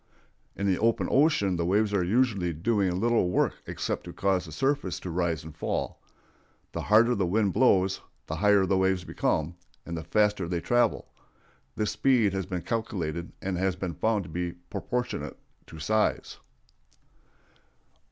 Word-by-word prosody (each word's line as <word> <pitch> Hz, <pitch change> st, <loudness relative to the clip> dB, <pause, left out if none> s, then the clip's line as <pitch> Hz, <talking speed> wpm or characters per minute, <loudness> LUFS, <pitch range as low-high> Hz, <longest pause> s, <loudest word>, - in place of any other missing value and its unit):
In 100 Hz, -, -3 dB
the 95 Hz, -2 st, +2 dB
open 115 Hz, +1 st, +2 dB
ocean 130 Hz, -, +3 dB
the 85 Hz, -, -1 dB
waves 105 Hz, +2 st, +2 dB
are 95 Hz, -3 st, +2 dB
usually 100 Hz, -3 st, +1 dB
doing 95 Hz, +1 st, 0 dB
little 115 Hz, -4 st, +2 dB
work 90 Hz, -, +2 dB
except -, -, -3 dB
to -, -, -8 dB
cause 95 Hz, -2 st, 0 dB
the 80 Hz, -, -10 dB
surface 135 Hz, -, -1 dB
to 90 Hz, -, -5 dB
rise 85 Hz, -2 st, -1 dB
and 80 Hz, -1 st, -10 dB
fall. -, -, -3 dB, 0.7 s
The -, -, -4 dB
harder 115 Hz, +3 st, +4 dB
the 100 Hz, -5 st, 0 dB
wind 100 Hz, +1 st, +1 dB
blows, 95 Hz, -6 st, +3 dB, 0.2 s
the -, -, -4 dB
higher 105 Hz, -2 st, +4 dB
the 95 Hz, 0 st, +1 dB
waves 95 Hz, -1 st, +1 dB
become, 80 Hz, -1 st, -1 dB, 0.3 s
and 85 Hz, -, -5 dB
the 80 Hz, -, -5 dB
faster 105 Hz, +1 st, +1 dB
they 85 Hz, 0 st, -1 dB
travel. 120 Hz, +6 st, +1 dB, 0.7 s
This 105 Hz, -1 st, -1 dB
speed 115 Hz, -3 st, +2 dB
has 95 Hz, -1 st, -3 dB
been 90 Hz, -3 st, -4 dB
calculated, 85 Hz, -6 st, -3 dB
and 95 Hz, -2 st, -2 dB
has 95 Hz, -1 st, +1 dB
been 90 Hz, -2 st, -4 dB
found 105 Hz, +5 st, 0 dB
to 80 Hz, -, -11 dB
be 85 Hz, +1 st, -3 dB, 0.2 s
proportionate 125 Hz, 0 st, -3 dB, 0.3 s
to -, -, -11 dB
size. 110 Hz, +8 st, 0 dB
95 Hz, 160 wpm, -27 LUFS, 90-110 Hz, 0.7 s, harder